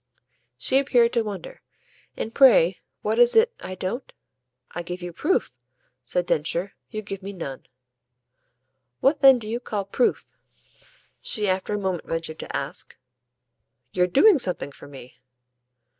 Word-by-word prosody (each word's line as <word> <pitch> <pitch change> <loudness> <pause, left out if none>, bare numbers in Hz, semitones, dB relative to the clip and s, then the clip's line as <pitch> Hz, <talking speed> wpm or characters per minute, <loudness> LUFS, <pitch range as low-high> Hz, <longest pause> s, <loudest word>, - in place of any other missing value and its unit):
She 265 - +2
appeared 245 -4 +3
to 235 - +2
wonder. 205 -5 -7 0.6
"And 225 - -4
pray 205 -10 +6 0.2
what 220 +2 0
is 240 0 +5
it 465 +2 +5
I 185 - -7
don't 190 +8 -4 0.3
?" 125 0 -47
"I 175 - -4
give 180 +1 -7
you 175 -1 -6
proof," 335 - 0 0.5
said 175 +8 0
Densher. 170 +4 -1 0.2
"You 215 0 -5
give 195 -1 -6
me 200 +1 -7
none." 140 -8 -7 1.3
"What 280 +2 +2
then 270 -2 +8
do 220 -3 -7
you 230 +2 -2
call 210 -5 -4
proof?" 240 +5 0 1.0
she 210 -2 -1
after 190 +2 -1
a - - -1
moment 190 -4 -3
ventured 165 -1 -4
to - - -4
ask. - - -4 0.9
"Your 180 -1 +2
doing 320 - +5
something 180 - -2
for - - -13
me." 130 -3 -13
195 Hz, 150 wpm, -24 LUFS, 175-240 Hz, 1.3 s, then